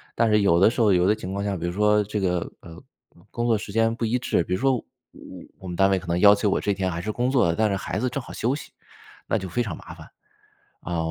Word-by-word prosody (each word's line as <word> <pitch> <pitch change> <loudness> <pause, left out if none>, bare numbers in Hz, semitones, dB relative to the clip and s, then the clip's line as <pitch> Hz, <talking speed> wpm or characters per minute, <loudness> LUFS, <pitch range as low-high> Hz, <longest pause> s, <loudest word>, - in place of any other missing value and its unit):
但 115 0 +2
是 105 -1 +3
有 85 -4 +3
的 95 - +6
时 120 +1 -2
候、 105 - +4
有 90 0 +3
的 105 - +4
情 95 -3 -7
况 100 0 -3
下， 100 -1 -1
比 85 -1 -4
如 85 - -1
说 105 +2 +2
这 105 +1 -3
个， 90 -3 -1
呃， 85 +4 -12 0.5
工 120 -1 -2
作 115 -2 +3
时 105 -1 -8
间 115 +1 +2
不 115 - -5
一 115 +3 +1
致， 120 -8 0
比 90 - -4
如 - - -4
说 135 0 +2
我 - - -9 0.8
我 95 - -10
们 90 - -5
单 95 +2 +3
位 95 - +2
可 90 - -13
能 85 +1 0
要 100 +1 +8
求 105 0 0
我 - - +1
这 100 - 0
天 95 -1 -2
还 85 - -4
是 110 +4 -3
工 120 +3 -1
作， 120 -11 +2
但 110 +3 +1
是 100 - 0
孩 - - -4
子 125 - 0
正 130 +2 -4
好 - - -10
休 125 +5 -1
息， - - -10 0.6
那 - - +1
就 95 - -5
非 120 - -1
常 100 -9 -4
麻 - - -11
烦。 - - -13 0.7
啊， 85 -1 -4
100 Hz, 315 characters per minute, -24 LUFS, 90-115 Hz, 0.8 s, 要